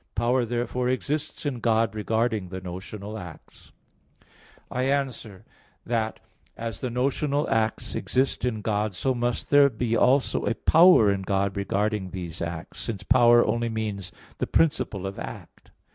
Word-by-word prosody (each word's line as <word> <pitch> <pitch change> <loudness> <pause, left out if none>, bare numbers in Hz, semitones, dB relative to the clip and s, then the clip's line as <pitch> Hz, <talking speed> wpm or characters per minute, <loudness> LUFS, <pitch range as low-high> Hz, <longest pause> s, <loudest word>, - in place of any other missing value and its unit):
Power 120 +3 +2
therefore 120 +1 -1
exists 145 +4 -2
in 135 -4 -2
God 115 -2 +2
regarding 110 -2 -1
the 95 +1 -5
notional 100 +4 -7
acts. 90 -5 -12 1.0
I 125 - -1
answer 130 -8 -2 0.4
that, 110 -2 -1 0.4
As 115 -3 -5
the 125 - -2
notional 140 +4 0
acts 110 -1 0
exist 130 +1 0
in 115 -4 -1
God, 105 -1 -1
so 130 +8 0
must 120 -1 -2
there 145 -1 +7
be 115 -1 -1
also 130 +3 +3
a 115 - 0
power 165 - +6
in 100 -1 -1
God 100 0 0
regarding 100 0 -1
these 90 -3 -6
acts; 85 -1 -5
since 110 -5 -4
power 120 -1 +5
only 120 0 0
means 105 -4 -4 0.3
the - - -1
principle 130 - +1
of 95 0 -5
act. - - -9
115 Hz, 145 wpm, -26 LUFS, 100-125 Hz, 1.0 s, there